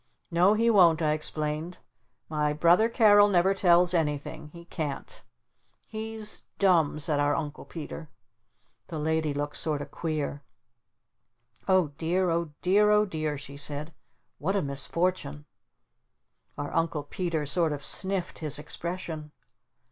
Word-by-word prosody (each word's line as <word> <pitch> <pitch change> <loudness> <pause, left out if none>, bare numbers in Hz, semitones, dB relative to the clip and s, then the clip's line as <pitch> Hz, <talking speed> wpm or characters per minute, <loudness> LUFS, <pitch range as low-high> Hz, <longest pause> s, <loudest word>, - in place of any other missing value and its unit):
"No 180 +5 +4
he 230 +2 +3
won't," 175 -6 +5
I 155 - +2
explained. 155 +2 -3 0.5
"My 150 -1 0
brother 175 +8 +4
Carol 205 -3 +6
never 190 0 +3
tells 180 -2 +4
anything. 150 -2 -2
He 170 +3 -13
can't." 155 -5 -5 0.6
"He's 220 -1 -3 0.2
dumb," 170 -7 +3
said 150 -1 +1
our 145 0 +2
Uncle 150 -2 -5
Peter. 160 -1 -8 0.8
The 160 - -6
Lady 160 0 0
looked 145 0 -3
sort 150 -2 0
of 145 - -8
queer. 150 -3 -3 1.3
"Oh 185 -5 +3
dear 175 +2 +1
Oh 170 -1 -1
dear 205 +3 +4
Oh 210 0 +4
dear," 155 -5 -3
she 140 0 -9
said. 150 +2 -1 0.5
"What 190 +6 -1
a 200 - +1
misfortune!" 150 +1 -2 1.1
Our 145 - -5
Uncle 165 -2 0
Peter 165 0 -3
sort 165 +2 +1
of 145 -1 -5
sniffed 190 -2 -1
his 150 -3 -1
expression. 160 -1 -6
165 Hz, 135 wpm, -27 LUFS, 150-185 Hz, 1.3 s, Carol